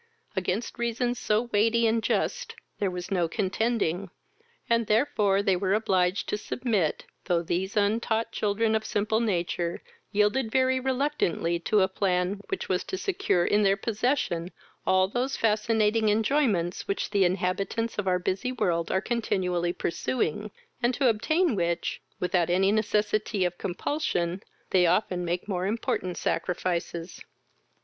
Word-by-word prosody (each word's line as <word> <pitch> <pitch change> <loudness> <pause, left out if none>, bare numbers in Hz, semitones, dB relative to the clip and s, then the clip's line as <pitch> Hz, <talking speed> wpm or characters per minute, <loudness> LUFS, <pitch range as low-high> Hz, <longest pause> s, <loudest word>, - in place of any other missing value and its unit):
Against 190 +5 -2
reasons 240 +1 -1
so 215 +2 +1
weighty 230 +3 +3
and 225 0 +2
just - - -1 0.2
there 200 - +1
was 180 0 -6
no 175 -3 +2
contending, 195 -1 -1 0.6
and 230 -1 +2
therefore 210 -4 +2
they 195 -2 +3
were 190 +2 +1
obliged 190 -3 +1
to 210 - -1
submit, 215 -8 -1 0.2
though 175 -2 +1
these 185 +5 -2
untaught 220 +2 +1
children 220 +1 0
of 220 0 +1
simple 220 +1 0
nature 175 -5 -1 0.3
yielded 210 +4 +2
very 260 +1 +2
reluctantly 260 - 0
to 205 +4 +2
a 190 - +4
plan 190 0 0
which 390 - -3
was 185 -1 0
to 380 - -4
secure 375 - +1
in 210 - +3
their 195 -1 +3
possession 215 -6 -1 0.4
all 185 0 +4
those 245 +6 -2
fascinating 220 0 +2
enjoyments 210 - +1
which 200 - -2
the 200 -2 +3
inhabitants 195 +5 -1
of 200 - -2
our 180 -1 +3
busy 190 +7 -2
world 170 -9 0
are 190 - +1
continually 180 -7 0
pursuing, 210 +2 -2 0.3
and 240 0 +2
to 265 -2 +3
obtain 310 +7 +1
which, 170 -2 -1 0.2
without 180 -1 +1
any 190 +3 +3
necessity 210 -2 +1
of 175 0 -1
compulsion, 180 - -2 0.3
they 180 -2 +4
often 180 0 +1
make 175 +2 -2
more 185 -2 -1
important 190 -4 -2
sacrifices. 175 -1 -2
205 Hz, 140 wpm, -27 LUFS, 180-230 Hz, 0.6 s, a